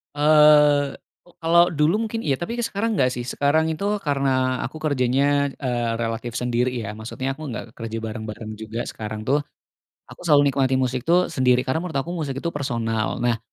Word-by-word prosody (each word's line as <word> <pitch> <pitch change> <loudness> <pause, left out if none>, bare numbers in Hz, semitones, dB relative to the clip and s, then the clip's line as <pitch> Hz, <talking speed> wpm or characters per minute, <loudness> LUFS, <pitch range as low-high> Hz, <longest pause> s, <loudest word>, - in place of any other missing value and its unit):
Eee, 150 -1 +5 0.3
ko 175 - -21
kalau 170 +1 +5
dulu 155 +8 +2
mungkin 225 +1 -4
iya, 135 -2 0
tapi 200 +7 -4
sekarang 225 0 -1
gak 130 -7 +2
sih, 120 -1 -5
sekarang 145 +4 +1
itu 200 +6 -1
karena 135 -5 0
aku 155 - -6
kerjanya, 140 0 +1
eee, 120 -4 -1
relatif 115 +1 -3
sendiri 125 +1 0
ya, 110 -4 -5
maksudnya 130 +5 -4
aku 155 - -13
gak 115 - -5
kerja 115 -1 -5
bareng-bareng 110 0 -6
juga 110 +2 -5
sekarang 110 0 -6
tuh. 145 +2 +2 0.6
Aku - - -15
selalu 145 -2 +5
nikmati 135 -1 +1
musik 130 0 -1
tuh 180 +2 +3
sendiri 125 -1 +3
karena 130 +4 -1
menurut 175 -2 -6
aku 140 +5 -1
musik 150 -6 -3
itu 170 - 0
personal. 115 -6 -2
Nah 120 -2 +1
135 Hz, 175 wpm, -23 LUFS, 120-150 Hz, 0.6 s, Eee